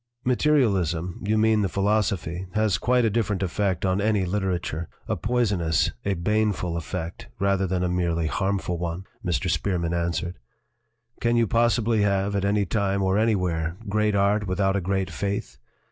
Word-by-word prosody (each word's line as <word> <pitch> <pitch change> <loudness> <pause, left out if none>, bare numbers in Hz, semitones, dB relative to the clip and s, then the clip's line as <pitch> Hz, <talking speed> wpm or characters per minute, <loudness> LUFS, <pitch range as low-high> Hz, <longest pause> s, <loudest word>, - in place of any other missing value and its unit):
"Materialism 100 - +1
you 105 +2 +1
mean 110 0 +3
the 100 - 0
philosophy 100 -3 0
has 110 -3 +2
quite 125 -1 +2
a - - +3
different 105 -3 0
effect 95 -1 -1
on 95 +1 +1
any 105 -2 +2
literature 90 -4 -2 0.2
a - - 0
poison 115 -6 0
ous, 80 -2 +2
a 100 -1 0
baneful 100 -1 0
effect, 85 +1 -5
rather 100 0 +1
than 90 0 -1
a - - +1
merely 85 -2 0
harm 100 +5 0
ful 90 -2 -3
one," 85 +2 -4 0.2
Mr. 90 0 -1
Spearman 85 0 0
answered. 85 +1 -2 0.8
"Can 120 0 +1
you 115 -1 +4
possibly 115 0 +2
have, 100 0 +1
at 100 0 0
any 100 0 +2
time 100 +1 0
or 95 +2 +2
anywhere, 90 -6 0
great 105 0 +1
art 100 +1 +2
without 95 +1 +1
a 100 - +1
great 95 +1 -1
faith? 100 -12 -3
95 Hz, 165 wpm, -25 LUFS, 90-105 Hz, 0.8 s, you